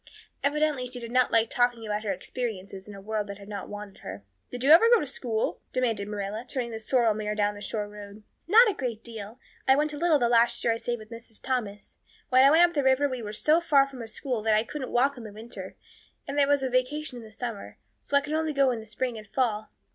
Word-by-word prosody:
Evidently 290 -3 +1
she 250 0 -6
did 235 -1 -8
not 255 0 +3
like 225 0 +4
talking 245 -2 +1
about 210 0 -2
her 205 - -1
experiences 195 -1 -5
in 205 - -9
a - - -9
world 210 +1 -3
that 200 -1 -7
had 200 -1 -13
not 205 -2 -6
wanted 205 -1 -8
her. 95 +2 -8 0.3
"Did 245 0 -6
you 280 - +5
ever 365 +9 +8
go 475 - +7
to - - -2
school?" 240 -5 -3
demanded 230 -6 0
Marilla, 210 +2 -4
turning 250 -3 -3
the 225 - -5
sorrel 230 0 +2
mare 210 0 -3
down 205 0 +1
the 205 - -11
shore 210 0 -3
road. 205 0 -11 0.2
"Not 455 +7 +7
a 420 - +1
great 240 -7 -4
deal. 225 -1 -8 0.3
I 265 - +7
went 300 +1 0
a 290 - -6
little 335 -2 +4
the 240 -4 +2
last 235 0 +3
year 230 - +3
I - - -3
stayed 240 +1 -3
with 215 0 -13
Mrs. 230 -1 -10
Thomas. 220 -6 -3 0.4
When 255 0 +6
I 275 - +8
went 330 +4 +7
up 285 - +2
river 265 +2 +4
we 255 -3 -4
were 210 -2 -5
so 305 +10 +2
far 280 -5 +4
from 265 -3 -9
a 230 - -6
school 240 +1 -3
that 215 0 +3
I 215 - +3
couldn't 270 +1 -6
walk 265 +2 +2
it - - -9
in 215 -2 -9
winter 225 +2 -9 0.5
and 280 - -4
there 285 -1 +4
was 285 -1 +2
a 260 - 0
vacation 255 0 -1
in 220 - -12
summer, 230 -2 -6 0.2
so 280 - +1
I - - +3
could 300 +2 -5
only 315 -1 0
go 275 -2 +3
in 235 - -3
the 220 - -10
spring 235 +1 -3
and 215 - -13
fall. 220 -3 -1
240 Hz, 255 wpm, -27 LUFS, 215-275 Hz, 0.5 s, ever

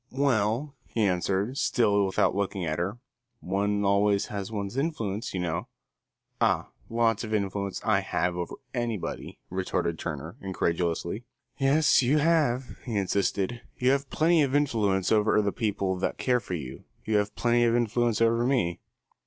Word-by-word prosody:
"Well," 130 0 +1
he 115 - -1
answered, 95 +6 0
still 100 -5 +2
without 95 - +2
looking 100 -2 -1
at 80 +1 -2
her, 95 +6 -2 0.4
"one 100 +2 0
always 100 0 +3
has 100 +1 -4
one's 100 0 -4
influence, 115 -8 -2
you 95 - -3
know." 85 -1 -2 0.7
"Ah, - - +2 0.2
lots 115 -1 +1
of 110 -1 -2
influence 100 -1 -2
I 105 -3 +3
have 90 -2 -1
over 90 -1 -4 0.2
anybody," 120 -5 -3
retorted 90 -3 -1
Turner, 80 +1 -5
incredulously. 85 +2 -1 0.3
"Yes, 140 +3 +4
you 135 +4 +3
have," 145 -5 +1
he 120 -4 -4
insisted. 100 +3 0 0.2
"You 125 +1 +3
have 140 0 0
plenty 165 +1 +3
of 140 -1 +1
influence 105 -10 +1
over 110 -1 +4
the 100 -1 +1
people 100 -4 -1
that 95 - -2
care 125 -1 +2
for 95 -5 -5
you. 65 -5 -7 0.2
You 110 -1 +2
have 105 0 -1
plenty 120 0 +2
of 115 0 +3
influence 120 -1 +1
over 115 +1 +3
me." 120 -10 +1
105 Hz, 155 wpm, -27 LUFS, 95-120 Hz, 0.7 s, Yes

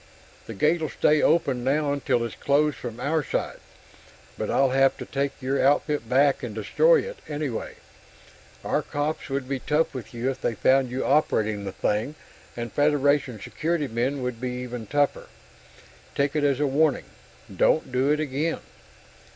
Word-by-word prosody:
"The 115 - -7
gate'll 155 - +1
stay 150 0 +2
open 135 -7 +2
now 140 +2 +1
until 125 -4 0
it's 115 - -6
closed 145 +1 +1
from 120 -1 -7
our 150 +4 0
side - - -3 0.8
but - - -4
I'll 135 -1 +3
have 135 +1 +3
to - - -7
take 140 0 -3
your 135 +1 0
outfit 145 -2 +1
back 135 +2 +3
and 115 -4 -6
destroy 475 - +3
it, - - -8
anyway. 145 -6 -4 0.9
Our - - 0
cops 145 +1 -3
would 135 -1 -2
be 135 -1 -2
tough 150 +4 0
with 130 -4 -7
you 120 +3 -1
if 130 - -9
they 115 - -1
found 130 +4 +3
you 130 +2 -3
operating 110 -8 +1
the 95 - -4
thing, 105 +9 -1 0.4
and 120 -1 -5
Federation 145 -4 +2
Securitymen 140 -2 -2
would 125 -2 -4
be 130 - -2
even 120 -3 -6
tougher. 145 +3 0 0.9
Take 140 +1 0
it 150 - +1
as 140 -2 +2
a 150 - +2
warning: 145 +1 +2 0.5
don't 155 - +2
do 130 +2 +1
it 150 +1 +2
again." 155 +2 -2
140 Hz, 165 wpm, -25 LUFS, 125-150 Hz, 0.9 s, I'll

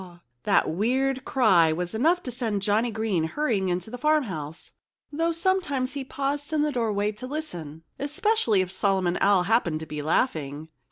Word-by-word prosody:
_" 175 -2 -13 0.2
That - - +3
weird 255 +9 0
cry 185 -11 +4
was 175 +2 -3
enough 330 +11 +2
to 250 - -5
send 220 -5 -2
Johnnie 215 +4 +2
Green 215 -7 -1
hurrying 205 - -1
into 180 +4 -3
the 250 - -6
farmhouse, 205 - -1 0.4
though 330 +3 0
sometimes 330 -7 0
he 280 -1 -4
paused 280 +2 -3
in 305 -1 +2
the 300 - 0
doorway 210 -5 0
to 215 +4 -8
listen—especially 270 - -1
if 185 -1 -3
Solomon 190 -2 +1
Owl 195 -2 +4
happened 180 -6 +1
to - - -5
be 150 -1 -5
laughing. 155 - -1
220 Hz, 165 wpm, -26 LUFS, 180-275 Hz, 0.4 s, cry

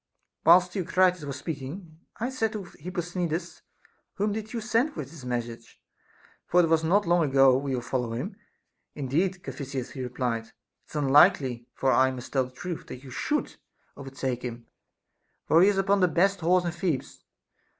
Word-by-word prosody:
Whilst 180 +2 +6
Theocritus 180 -2 +1
was 140 -1 -5
speaking, 160 +3 -7 0.2
I 240 +4 -2
said 225 -4 -1
to 210 -2 -4
Hip 180 0 -10
posthcnides, 175 -1 -3 0.5
Whom 205 +1 0
did 220 0 -5
you 235 - -3
send 235 +6 0
with 140 -2 -6
this 160 -5 -12
message? 120 -2 -5 0.7
for 180 - +3
if - - +6
it - - -3
was 160 0 +3
not 200 +6 +3
long 175 0 +3
ago, 135 -2 +5
we 135 0 -1
will 120 - -4
follow 125 -1 -2
him. 155 - -4 0.6
Indeed, 170 +7 -1
Ca - - -5
phisias, 135 -3 -5
he 130 - -6
replied, 125 -2 -2
it - - -24 0.4
is - - -13
unlikely 135 -4 +4
(for 135 - +1
I 130 0 +4
must 130 -1 -8
tell 130 -2 +2
the 125 - -12
truth) 170 +6 -6
that 130 - -9
you 130 - -11
should 295 - -2 0.4
overtake 135 -2 -4
him, 120 -1 -6 0.8
for 165 - +5
he 195 - +7
is 200 - 0
upon 195 +1 +2
the 180 - +4
best 195 +4 +2
horse 175 +2 +2
in 170 - 0
Thebes. 170 -5 -3
160 Hz, 185 wpm, -27 LUFS, 130-185 Hz, 0.8 s, he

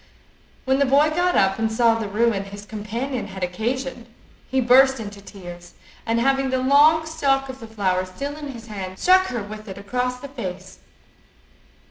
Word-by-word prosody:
When 265 +1 +2
the 280 - +4
boy 285 +3 +4
got 355 +3 +1
up, 195 +2 +3
and 225 0 0
saw 230 0 +4
the 225 -2 -3
ruin 210 -1 +1
his 200 +1 -10
companion 220 +5 -4
had 190 -1 -7
occasioned, 240 +6 -3 0.4
he 265 - +1
burst 260 +1 +5
into 205 -2 -8
tears, 175 -3 -11 0.3
and 230 +1 +1
having 270 +2 +2
the 260 - +1
long 290 +5 +5
stalk 270 -4 0
of 260 0 -8
the 225 - -9
flower 190 -4 0
still 280 +10 -5
in 300 -1 -7
his 235 -5 -9
hand, 190 -4 -7
struck 375 - +4
her 240 - -3
with 215 +2 -9
it 190 - -7
across 250 +5 -2
the 280 - -8
face. 190 -8 -7
235 Hz, 180 wpm, -22 LUFS, 200-270 Hz, 0.4 s, burst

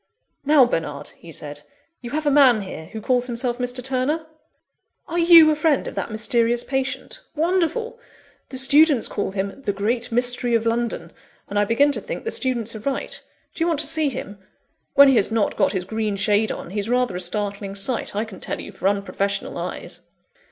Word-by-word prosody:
"Now, 285 -2 +6
Bernard," 155 -10 -3
he 170 - -14
said, 145 -1 -7 0.4
"you 240 - -7
have 305 +4 -3
a 290 - +3
man 265 -6 +5
here, 185 -5 -8
who 220 - -8
calls 250 +2 +1
himself 240 0 -2
Mr. 250 0 -3
Turner?" 265 +5 -1 0.8
"Are 340 +2 -2
you 335 -2 +8
a - - +1
friend 305 -2 +1
of - - -6
that - - -4
mysterious 230 +2 +1
patient? 270 - -3
Wonderful! 375 +9 0 0.5
The 260 - -6
students 280 0 +4
call 205 - -3
him 195 +5 -4
'The 205 - -2
Great 225 +5 -1
Mystery 245 0 +1
of 230 0 0
London;' 230 -7 -2 0.4
and 205 - -1
I 205 - +3
begin 280 +7 +3
to - - +1
think - - -6
the 455 - -3
students 235 -4 -1
are - - -6
right. 270 +5 -2 0.3
Do 330 - -2
you - - +1
want 325 -4 0
to - - +4
see 315 0 +2
him? 205 -5 -7 0.6
When 280 0 +9
he 265 -3 +5
has 205 - +2
not 225 -2 0
got - - +2
his 185 -2 -2
green 215 0 -2
shade 210 +2 +2
on, 170 - -7
he's 205 +2 -3
rather 245 -5 +1
a 180 - -3
startling 200 +2 -3
sight, 200 +2 -1
I 215 +2 -1
can 200 -4 -11
tell - - -4
you, - - -8
for 190 - -2
unprofessional 200 0 -1
eyes." - - -6
240 Hz, 200 wpm, -22 LUFS, 205-280 Hz, 0.8 s, When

